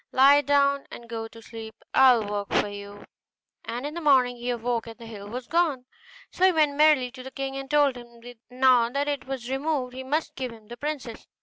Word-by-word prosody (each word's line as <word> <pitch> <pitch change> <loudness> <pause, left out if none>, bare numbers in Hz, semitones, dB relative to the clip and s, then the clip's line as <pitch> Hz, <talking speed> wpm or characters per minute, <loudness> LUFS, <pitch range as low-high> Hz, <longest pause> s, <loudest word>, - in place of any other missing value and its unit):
'Lie 280 +2 +6
down 280 -1 +2
and 235 - -11
go 225 -1 -5
to 230 0 -15
sleep; 225 -1 -9 0.2
I 260 -2 +7
will 220 - -2
work 205 0 -4
for - - +2
you.' 205 0 -9 0.6
And 240 +4 -4
in 295 - -4
the 340 - -5
morning 260 -5 +4
he 240 +1 -5
awoke 235 -1 -2
and 225 - -10
the 235 - -11
hill 205 -3 -9
was 250 +2 -6
gone; 310 -5 0 0.5
so 365 - -3
he 375 - +6
went 305 -4 +2
merrily 295 -4 +4
to 255 - -10
the 260 - -8
king, 270 0 -5
and 270 0 -6
told 290 -2 +3
him 240 -1 -13
that 245 -1 -12
now 250 -2 +4
that 280 +3 -2
it 285 -2 -3
was 265 -3 -5
removed 270 -2 -1
he 260 +1 -6
must 300 +5 -2
give 255 -2 -5
him 220 -1 -15
the 240 - -8
princess. 285 -6 -5
255 Hz, 230 wpm, -26 LUFS, 235-280 Hz, 0.6 s, I